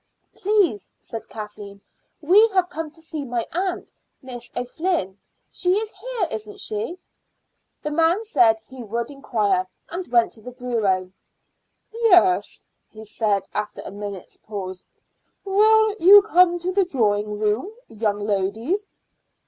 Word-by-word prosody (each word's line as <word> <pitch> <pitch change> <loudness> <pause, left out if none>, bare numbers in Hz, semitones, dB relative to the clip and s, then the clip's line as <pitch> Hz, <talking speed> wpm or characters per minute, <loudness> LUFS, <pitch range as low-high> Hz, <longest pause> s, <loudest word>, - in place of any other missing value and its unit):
"Please," 380 - +1
said 225 - -8
Kathleen, 210 -2 -9 0.4
"we 390 +9 +6
have 360 -1 +3
come 320 0 -4
to 320 - -13
see 315 -2 -5
my 240 -3 -2
aunt, 365 +1 -3 0.3
Miss 245 -2 -8
O'Flynn. 250 - -2 0.3
She 360 0 +1
is 430 +1 -2
here, 445 -1 -3
isn't 215 -1 -6
she?" 215 +12 -4 0.9
The 300 - -2
man 330 +7 +2
said 230 - +3
he 255 +3 -12
would 235 +3 -4
inquire, 210 -9 0 0.2
and 355 +2 -5
went 235 -1 +3
to 220 - -14
the 250 +3 -9
bureau. 215 -7 -1 0.8
"Yes," 375 -6 +3 0.3
he 220 0 -12
said 210 -2 0
after 210 0 -4
a - - -8
minute's 200 -2 -8
pause. 190 -3 -7 0.6
"Will 430 +2 +4
you 395 +3 +8
come 360 -4 +4
to 350 +1 -3
the 390 0 +3
drawing 210 - 0
room, 215 - 0 0.2
young 210 -2 -2
ladies?" 215 - -1
250 Hz, 135 wpm, -23 LUFS, -, 0.9 s, you